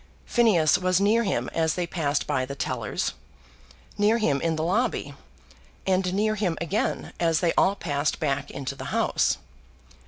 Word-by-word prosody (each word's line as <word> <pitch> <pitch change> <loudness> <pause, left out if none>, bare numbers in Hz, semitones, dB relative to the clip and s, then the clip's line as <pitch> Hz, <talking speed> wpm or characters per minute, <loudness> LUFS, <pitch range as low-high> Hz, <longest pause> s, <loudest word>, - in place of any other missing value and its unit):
Phineas 205 - +3
was 185 0 +2
near 210 +4 +3
him 195 - -1
as 160 -1 +1
they 180 - -1
passed 150 -4 -1
by 140 -3 0
the 140 +2 -5
tellers, 120 -4 -2 0.9
near 210 +3 +4
him 145 -11 +1
in 165 -1 0
the 155 - -2
lobby, 210 +9 0 0.7
and 185 -1 +1
near 215 +2 +2
him 190 -6 -1
again 175 +6 -2
as 165 -2 +2
they 170 -2 +1
all 195 - +3
passed 145 -5 -1
back 145 -2 -1
into 140 -1 -5
the 135 -1 -8
House. - - +1
170 Hz, 160 wpm, -26 LUFS, 145-200 Hz, 0.9 s, near